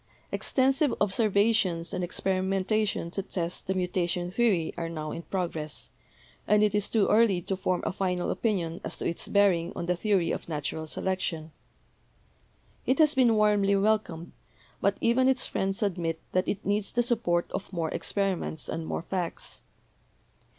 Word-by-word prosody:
Extensive 270 Hz, +2 st, +2 dB
observations 200 Hz, -4 st, +2 dB
and 180 Hz, -, -2 dB
experimentation 190 Hz, +1 st, 0 dB
to 195 Hz, -, -2 dB
test 175 Hz, -3 st, -4 dB
the 190 Hz, -, 0 dB
mutation 180 Hz, -1 st, -1 dB
theory 190 Hz, -7 st, +1 dB
are 165 Hz, -1 st, -3 dB
now 155 Hz, -2 st, -5 dB
in -, -, -5 dB
progress, 165 Hz, -5 st, -3 dB, 0.6 s
and 210 Hz, 0 st, +4 dB
it 210 Hz, -1 st, +2 dB
is 210 Hz, -1 st, +1 dB
too 215 Hz, -3 st, +3 dB
early 215 Hz, -5 st, +4 dB
to 195 Hz, -, -2 dB
form 185 Hz, -1 st, -1 dB
a -, -, -1 dB
final 180 Hz, -2 st, -1 dB
opinion 180 Hz, -7 st, -1 dB
as -, -, -4 dB
to -, -, -4 dB
its 170 Hz, -, -1 dB
bearing 190 Hz, -4 st, +3 dB
on 170 Hz, -, -3 dB
the 180 Hz, +1 st, +1 dB
theory 185 Hz, -2 st, +1 dB
of -, -, -4 dB
natural 155 Hz, +1 st, -3 dB
selection. 165 Hz, -3 st, -3 dB, 1.4 s
It 260 Hz, -, +3 dB
has 310 Hz, -2 st, +5 dB
been 245 Hz, -4 st, +4 dB
warmly 205 Hz, -2 st, +3 dB
welcomed, 195 Hz, -5 st, 0 dB, 0.5 s
but 200 Hz, +1 st, +2 dB
even 255 Hz, +3 st, +4 dB
its 265 Hz, -1 st, +2 dB
friends 195 Hz, +2 st, -1 dB
admit 170 Hz, -5 st, -1 dB
that 185 Hz, 0 st, +1 dB
it 200 Hz, -, -3 dB
needs 205 Hz, 0 st, 0 dB
the 240 Hz, -, +2 dB
support 215 Hz, -8 st, 0 dB
of 200 Hz, -, -5 dB
more 165 Hz, -4 st, -2 dB
experi 195 Hz, -2 st, 0 dB
ments 155 Hz, -2 st, -4 dB
and 160 Hz, 0 st, -4 dB
more -, -, -3 dB
facts. 180 Hz, -2 st, -4 dB
190 Hz, 160 wpm, -28 LUFS, 170-210 Hz, 1.4 s, has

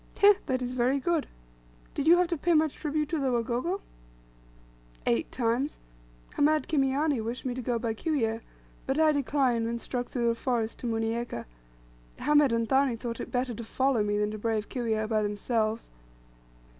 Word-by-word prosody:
"Heh, 410 Hz, 0 st, +8 dB
that 255 Hz, -2 st, 0 dB
is 250 Hz, 0 st, -3 dB
very 255 Hz, +2 st, +2 dB
good." 330 Hz, +1 st, 0 dB, 0.7 s
"Did 285 Hz, -, -2 dB
you 345 Hz, +2 st, +8 dB
have 360 Hz, 0 st, +3 dB
to 345 Hz, -, 0 dB
pay 340 Hz, +2 st, +1 dB
much 310 Hz, -1 st, +3 dB
tribute 300 Hz, -1 st, -2 dB
to 320 Hz, -, -1 dB
the 270 Hz, -2 st, +1 dB
Wagogo?" 245 Hz, -, -1 dB, 1.2 s
"Eight 115 Hz, -1 st, +1 dB
times; 245 Hz, +4 st, 0 dB, 0.6 s
Hamed 305 Hz, +1 st, +3 dB
Kimiani 275 Hz, -3 st, +1 dB
wished 235 Hz, +4 st, -5 dB
me 255 Hz, -, -1 dB
to 255 Hz, -, -4 dB
go 240 Hz, 0 st, 0 dB
by 230 Hz, -1 st, -2 dB
Kiwyeh, 225 Hz, -4 st, -1 dB, 0.5 s
but 270 Hz, +2 st, 0 dB
I 315 Hz, -1 st, +5 dB
declined, 265 Hz, -5 st, +1 dB
and 235 Hz, 0 st, -2 dB
struck 245 Hz, 0 st, -3 dB
through 235 Hz, -2 st, 0 dB
the -, -, +2 dB
forest 230 Hz, -2 st, -2 dB
to 245 Hz, -, -4 dB
Munieka. 225 Hz, -, -2 dB, 0.7 s
Hamed 295 Hz, -2 st, +4 dB
and 230 Hz, 0 st, +1 dB
Thani 265 Hz, -1 st, +3 dB
thought 230 Hz, 0 st, -5 dB
it -, -, -5 dB
better 250 Hz, 0 st, -1 dB
to 230 Hz, -, -6 dB
follow 260 Hz, +1 st, +1 dB
me, 205 Hz, 0 st, 0 dB
than 210 Hz, +1 st, 0 dB
brave 215 Hz, -1 st, -1 dB
Kiwyeh 220 Hz, -4 st, -1 dB
by 215 Hz, -1 st, +1 dB
themselves." 215 Hz, +2 st, -1 dB
245 Hz, 175 wpm, -28 LUFS, 230-285 Hz, 1.2 s, Heh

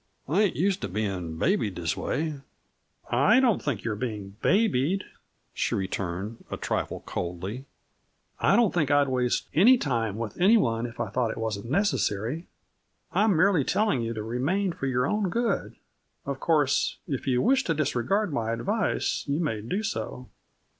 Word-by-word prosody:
I 170 Hz, +9 st, +2 dB
ain't 205 Hz, -4 st, +2 dB
used 190 Hz, +3 st, +1 dB
to -, -, -2 dB
bein' 95 Hz, -5 st, -3 dB
babied 110 Hz, -, +1 dB
this 85 Hz, -4 st, -1 dB
way." 150 Hz, -2 st, -2 dB, 0.7 s
"I 170 Hz, -, +5 dB
don't 245 Hz, -5 st, +3 dB
think 140 Hz, -, -2 dB
you 115 Hz, -, -1 dB
are -, -, -2 dB
being 105 Hz, -4 st, -5 dB
'babied,'" 190 Hz, -, +2 dB, 0.5 s
she -, -, -1 dB
returned 95 Hz, +3 st, -4 dB
a -, -, -4 dB
trifle -, -, -2 dB
coldly. 95 Hz, +9 st, -5 dB, 0.7 s
"I -, -, +4 dB
don't 235 Hz, -5 st, +3 dB
think 155 Hz, -6 st, +1 dB
that 145 Hz, -, +4 dB
I -, -, +6 dB
would 140 Hz, -, -3 dB
waste 125 Hz, -1 st, 0 dB
any 225 Hz, -, +7 dB
time 115 Hz, -, -1 dB
with 115 Hz, +5 st, -5 dB
anyone 120 Hz, -, +4 dB
if 120 Hz, -, -12 dB
I -, -, -2 dB
thought 125 Hz, -3 st, 0 dB
it -, -, -5 dB
wasn't 110 Hz, -1 st, -3 dB
necessary. 155 Hz, -, 0 dB, 0.6 s
I 210 Hz, -, +3 dB
am 200 Hz, -7 st, +3 dB
merely 180 Hz, -3 st, +4 dB
telling 205 Hz, -, +1 dB
you 115 Hz, 0 st, -3 dB
to 110 Hz, -, -4 dB
remain 145 Hz, -, 0 dB
for 135 Hz, -, -4 dB
your 125 Hz, -1 st, +1 dB
own 210 Hz, +2 st, 0 dB
good. 230 Hz, 0 st, -1 dB, 0.5 s
Of 140 Hz, -1 st, -3 dB
course, 150 Hz, -4 st, +2 dB
if 135 Hz, -2 st, -3 dB
you 125 Hz, -2 st, +2 dB
wish 265 Hz, +3 st, +3 dB
to 165 Hz, -, 0 dB
disregard 155 Hz, -, 0 dB
my 115 Hz, -4 st, -1 dB
advice 200 Hz, -, -1 dB
you 140 Hz, +2 st, 0 dB
may 130 Hz, -11 st, -1 dB
do 185 Hz, -, -2 dB
so." 130 Hz, -11 st, -4 dB
135 Hz, 175 wpm, -27 LUFS, -, 0.7 s, any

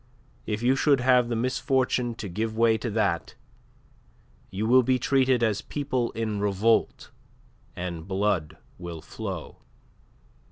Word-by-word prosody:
If 110 Hz, +1 st, -2 dB
you 130 Hz, +2 st, +4 dB
should 140 Hz, 0 st, +3 dB
have 125 Hz, -1 st, +4 dB
the 120 Hz, -, -1 dB
misfortune 130 Hz, 0 st, 0 dB
to 110 Hz, -, -6 dB
give 110 Hz, +4 st, -3 dB
way 115 Hz, -1 st, +4 dB
to 115 Hz, +2 st, -3 dB
that, 100 Hz, -6 st, -1 dB, 1.1 s
you 100 Hz, +3 st, -3 dB
will 130 Hz, +3 st, +6 dB
be 130 Hz, +1 st, +2 dB
treated 130 Hz, -1 st, +2 dB
as 105 Hz, -2 st, +1 dB
people 130 Hz, -5 st, -2 dB
in 110 Hz, -2 st, -2 dB
revolt, 105 Hz, +3 st, +1 dB, 0.6 s
and 85 Hz, -2 st, -5 dB
blood 95 Hz, -5 st, -1 dB, 0.2 s
will 85 Hz, -2 st, -7 dB
flow." 95 Hz, -2 st, -7 dB
115 Hz, 130 wpm, -26 LUFS, 100-125 Hz, 1.1 s, will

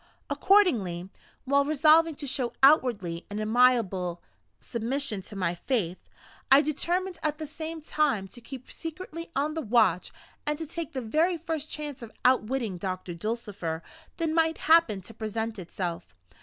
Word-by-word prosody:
Accordingly, 210 Hz, -, +3 dB, 0.4 s
while 280 Hz, +1 st, +4 dB
resolving 310 Hz, +2 st, +4 dB
to 290 Hz, -, -6 dB
show 260 Hz, -3 st, -1 dB
outwardly 225 Hz, -, +4 dB
an 205 Hz, -, -5 dB
amiable 215 Hz, -6 st, +2 dB, 0.4 s
submission 235 Hz, -2 st, -2 dB
to 205 Hz, -, -12 dB
my 180 Hz, -3 st, 0 dB
fate, 185 Hz, -2 st, -1 dB, 0.5 s
I 275 Hz, +2 st, +8 dB
determined 350 Hz, +4 st, -1 dB
at 305 Hz, -1 st, -1 dB
the 310 Hz, -, -5 dB
same 315 Hz, +2 st, -6 dB
time 290 Hz, -10 st, 0 dB
to 240 Hz, -, -13 dB
keep 260 Hz, +1 st, -9 dB
secretly 335 Hz, 0 st, -7 dB
on 295 Hz, +3 st, 0 dB
the 320 Hz, -, -2 dB
watch, 215 Hz, -, +2 dB, 0.3 s
and 300 Hz, 0 st, 0 dB
to 325 Hz, -, -4 dB
take 325 Hz, 0 st, -5 dB
the 260 Hz, -, -2 dB
very 320 Hz, +10 st, +1 dB
first 320 Hz, -2 st, -4 dB
chance 295 Hz, -4 st, -6 dB
of 230 Hz, -2 st, -8 dB
outwitting 245 Hz, -6 st, +2 dB
Doctor 185 Hz, -1 st, -4 dB
Dulcifer 195 Hz, -4 st, -4 dB, 0.3 s
that 330 Hz, -1 st, 0 dB
might 325 Hz, 0 st, +2 dB
happen 315 Hz, -11 st, +4 dB
to 225 Hz, -, -10 dB
present 220 Hz, 0 st, -3 dB
itself. 175 Hz, -, -5 dB
255 Hz, 150 wpm, -28 LUFS, 205-310 Hz, 0.5 s, I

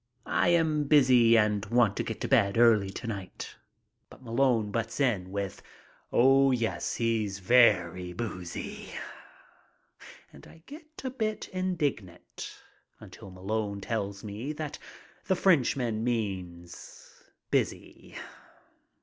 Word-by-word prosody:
"I -, -, +1 dB
am 160 Hz, -3 st, +2 dB
busy 125 Hz, -5 st, +5 dB
and 105 Hz, -2 st, +2 dB
want 120 Hz, -4 st, +3 dB
to -, -, 0 dB
get 110 Hz, -, -5 dB
to -, -, -1 dB
bed 110 Hz, -6 st, +3 dB
early 110 Hz, -4 st, +5 dB
to 100 Hz, -, -8 dB
night." 100 Hz, -5 st, -6 dB, 0.5 s
But -, -, -16 dB
Malone 115 Hz, -3 st, +1 dB
butts 115 Hz, +2 st, -3 dB
in 105 Hz, -10 st, +1 dB
with, 100 Hz, -1 st, -4 dB, 0.5 s
"Oh 135 Hz, +2 st, +5 dB
yes, 120 Hz, -3 st, -1 dB
he's 110 Hz, -4 st, -1 dB
very 95 Hz, -5 st, +3 dB
boozy." 90 Hz, -4 st, -6 dB, 1.4 s
And -, -, -14 dB
I 165 Hz, -, -17 dB
get 310 Hz, +1 st, -12 dB
a 260 Hz, -, -3 dB
bit 215 Hz, -4 st, -3 dB
indignant 155 Hz, -, -4 dB, 0.4 s
until 100 Hz, -, -12 dB
Malone 100 Hz, +2 st, -3 dB
tells 100 Hz, -1 st, -4 dB
me 110 Hz, +8 st, -5 dB
that 150 Hz, -1 st, -6 dB, 0.5 s
the 190 Hz, -, +2 dB
Frenchman 125 Hz, -, +2 dB
means 95 Hz, -7 st, -5 dB, 0.3 s
"busy." -, -, -2 dB
115 Hz, 115 wpm, -28 LUFS, 100-135 Hz, 1.4 s, busy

